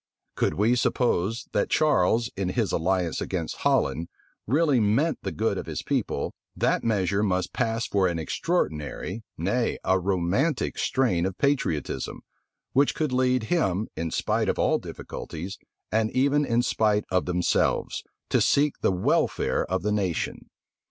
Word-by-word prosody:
Could - - 0
we 110 +5 +3
suppose 115 -2 0
that - - 0
Charles, 115 -6 +2
in 95 -2 -1
his 110 +2 0
alliance 90 0 0
against - - -3
Holland, 85 +2 +1 0.4
really 145 +1 +3
meant 115 +10 +2
the - - -3
good 105 -3 0
of - - -7
his - - -4
people, - - -1 0.2
that - - +1
measure 100 -3 +1
must 95 -3 0
pass 115 +1 0
for 95 -2 +2
an 85 -2 -1
extraordinary, 90 - -2 0.2
nay, 105 +9 0
a 95 0 +3
romantic 95 - 0
strain 115 -11 +1
of 95 - -6
patriotism, 140 - -1 0.5
which 140 +2 +3
could 155 -5 -1
lead 125 -1 +2
him, 105 - +1
in 80 +1 -2
spite - - 0
of - - 0
all - - +2
difficulties, 90 +5 -7 0.3
and 110 0 +2
even 140 +3 +3
in 120 -1 +2
spite 105 -3 +1
of 90 -1 +2
themselves, 90 0 0 0.3
to - - +3
seek 145 0 +2
the - - +3
welfare 90 0 +1
of 95 0 -1
the 105 - 0
nation. 95 -5 -2
105 Hz, 150 wpm, -26 LUFS, 90-125 Hz, 0.5 s, we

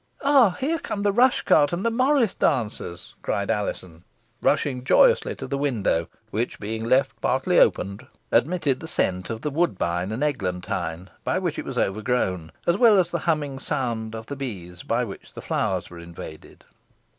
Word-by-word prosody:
"Ah! 265 -10 +5
here 320 +5 0
come 205 -10 -4
the 205 - +3
rush 245 +5 +3
cart 145 -1 +4
and 175 +4 -2
the 230 - +2
morris 255 -2 +3
dancers," 105 -6 -2
cried 100 0 -1
Alizon, 90 -5 -4 0.4
rushing 140 -4 +1
joyously 485 - +4
to - - -7
the 140 +1 -3
window, 110 - 0 0.2
which, 115 +4 -2
being 110 +2 -4
left 130 +3 +2
partly - - +2
open, 100 +2 +2 0.3
admitted 160 -6 +2
the 160 - -8
scent 90 - -1
of 115 -1 -4
the 150 - -2
woodbine 95 - 0
and 120 +6 -2
eglantine 90 - -3
by - - 0
which - - -2
it - - -5
was - - -5
overgrown, 95 -5 0
as 170 +2 +2
well 225 -4 +7
as 175 -1 +1
the 170 - -1
humming 145 -4 0
sound 120 -6 -2
of 110 0 -7
the 140 - -6
bees 90 -10 -7
by 120 +2 0
which 100 -5 -9
the - - -8
flowers - - -1
were 85 - -10
invaded. 85 -2 -11
125 Hz, 175 wpm, -24 LUFS, -, 0.4 s, well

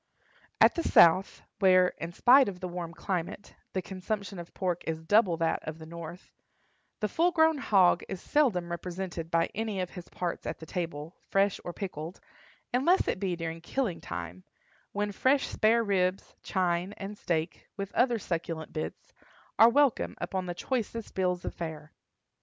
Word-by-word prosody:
At - - +7
the 340 - -1
South, 185 - +5 0.2
where, 185 -2 +6
in 165 - -4
spite 255 +6 +6
of 185 -2 -8
the 185 - -4
warm 175 -1 -5
climate, 180 +2 -4 0.2
the 185 - -1
consumption 195 0 -4
of 170 - -9
pork 180 -2 -2
is 160 0 -3
double 200 -2 +4
that 165 -1 +1
of 155 0 -6
the 160 - -10
North, 170 +1 -9 0.7
the 210 - +2
full 335 - +2
grown 320 -3 +3
hog 190 -8 +4
is 190 - -4
seldom 190 -14 +1
represented 175 -1 -5
by 165 -1 +1
any 220 -2 -2
of 180 -1 -3
his 180 -2 -10
parts 175 -2 -4
at - - -3
the 160 - -10
table, 165 -1 -5
fresh 195 0 +2
or 175 - -4
pickled, 175 -2 -6 0.5
unless 310 +10 +3
it - - 0
be 190 -3 -1
during 165 -1 -5
killing 215 -1 -2
time, 85 +1 -6 0.5
when 205 0 -1
fresh 260 +7 +2
spare 230 +2 +2
ribs, 190 -2 0
chine, 180 0 0
and 200 +1 -6
steak, 170 -4 -3
with 200 -1 -5
other 245 -2 +3
succulent 165 -4 -4
bits, 155 - -6 0.5
are 225 - +9
welcome 280 0 +2
upon 185 -1 -3
the 175 - -4
choicest 230 0 -3
bills 180 -1 0
of - - -3
fare. 155 -2 -7
185 Hz, 170 wpm, -29 LUFS, 170-210 Hz, 0.7 s, are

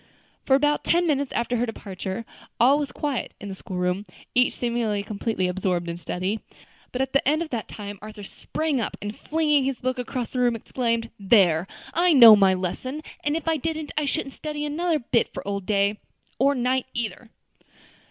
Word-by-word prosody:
For 265 - +6
about 295 +2 +2
ten 345 +1 +3
minutes 285 -4 0
after 240 +1 0
her 240 - +1
departure, 195 0 -5 0.3
all 270 +5 +5
was 285 -3 -3
quiet 280 -2 -3
in 205 - -7
the - - -4
school 190 -1 -7
room, 180 +3 -1 0.3
each 250 0 +3
seemingly 235 -4 -1
completely 205 -2 -1
absorbed 180 -1 -1
in 170 - -3
study. 185 +5 -2 0.5
But 255 +1 0
at 265 - -5
the 275 - +2
end 310 +3 +3
of 315 - -10
that 230 -4 -3
time 205 -2 -8
Arthur 215 0 -9
sprang 295 +6 -2
up, - - -3
and 205 +1 -5
flinging 300 -3 +1
his 265 -1 -1
book 255 0 -2
across 245 0 -3
the 255 - -2
room, 245 -1 +3
exclaimed, 230 0 -2
"There! 190 -5 +4 0.3
I 350 +1 +4
know 235 -6 +11
my 195 -2 +4
lesson; 255 - -4 0.2
and 295 +1 +1
if 330 - -7
I 325 -1 +2
didn't, 315 +1 -3
I 300 - +1
shouldn't 275 -1 -2
study 300 -1 -4
another 325 +2 0
bit 240 -3 0
for - - -6
old 200 -2 -3
Day, 205 0 +2 0.4
or 280 +2 +4
Night 255 +1 0
either." 235 0 -4
240 Hz, 190 wpm, -25 LUFS, 205-285 Hz, 0.5 s, know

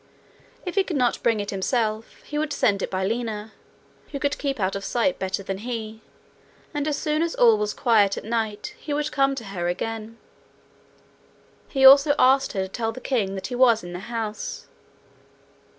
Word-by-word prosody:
If 360 - -3
he 395 - +3
could 350 -6 -3
not 245 -2 +1
bring 230 -2 +2
it 205 0 -3
himself, 215 +2 -2
he 295 - -4
would 305 -1 -2
send 200 -7 +1
it - - -2
by 190 0 -1
Lina, 220 -1 -3 0.6
who 285 - -5
could 285 +1 -1
keep 275 -4 -2
out 190 0 0
of 195 - -4
sight 245 +6 0
better 190 +1 -2
than 195 0 -4
he, 220 -1 -5 0.7
and 295 0 -2
as 300 -1 0
soon 305 +1 0
as 335 0 -1
all 230 -2 +6
was 210 0 -2
quiet 210 -4 +3
at - - -5
night 220 -2 -3
he 295 -1 -3
would 300 +1 -1
come 275 -1 +2
to 250 - -6
her 190 -4 -4
again. 225 +5 -4 1.5
He 270 -1 +3
also 280 +2 +8
asked 265 +1 +4
her 195 - -1
to - - -4
tell 225 +3 -3
the 225 - -9
king 215 -8 -1
that 190 - -5
he 250 - -4
was 240 -3 +4
in 175 0 -8
the 175 - -5
house. 225 -2 -4
230 Hz, 195 wpm, -24 LUFS, 205-275 Hz, 1.5 s, also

